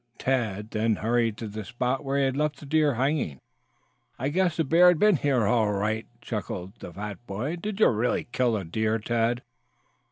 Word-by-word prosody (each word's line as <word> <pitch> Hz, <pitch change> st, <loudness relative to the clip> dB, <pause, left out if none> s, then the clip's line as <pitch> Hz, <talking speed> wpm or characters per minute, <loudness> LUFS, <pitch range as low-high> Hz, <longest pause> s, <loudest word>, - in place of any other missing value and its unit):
Tad 110 Hz, -5 st, -1 dB
then 110 Hz, 0 st, +1 dB
hurried 115 Hz, 0 st, 0 dB
to 115 Hz, -, -5 dB
the 105 Hz, +1 st, -6 dB
spot 125 Hz, +5 st, -2 dB
where 135 Hz, 0 st, -1 dB
he 140 Hz, -, +3 dB
had 135 Hz, -1 st, 0 dB
left 150 Hz, +1 st, -1 dB
the -, -, -10 dB
deer 150 Hz, -2 st, +2 dB
hanging. 130 Hz, -, 0 dB, 0.8 s
"I 135 Hz, +3 st, -1 dB
guess 175 Hz, +1 st, +1 dB
the 165 Hz, -, +2 dB
bear 165 Hz, +5 st, +5 dB
has 180 Hz, -, +3 dB
been 210 Hz, 0 st, +4 dB
here 135 Hz, -6 st, +1 dB
all 110 Hz, -1 st, +2 dB
right," 110 Hz, +3 st, -1 dB
chuckled 95 Hz, -5 st, -5 dB
the -, -, -8 dB
fat 105 Hz, +4 st, -7 dB
boy. 125 Hz, -, -3 dB
"Did 205 Hz, +3 st, -5 dB
you -, -, +7 dB
really 115 Hz, +2 st, 0 dB
kill 125 Hz, -3 st, +1 dB
a 95 Hz, -, -5 dB
deer, 110 Hz, +6 st, 0 dB
Tad?" 115 Hz, +2 st, 0 dB
120 Hz, 195 wpm, -26 LUFS, 110-145 Hz, 0.8 s, you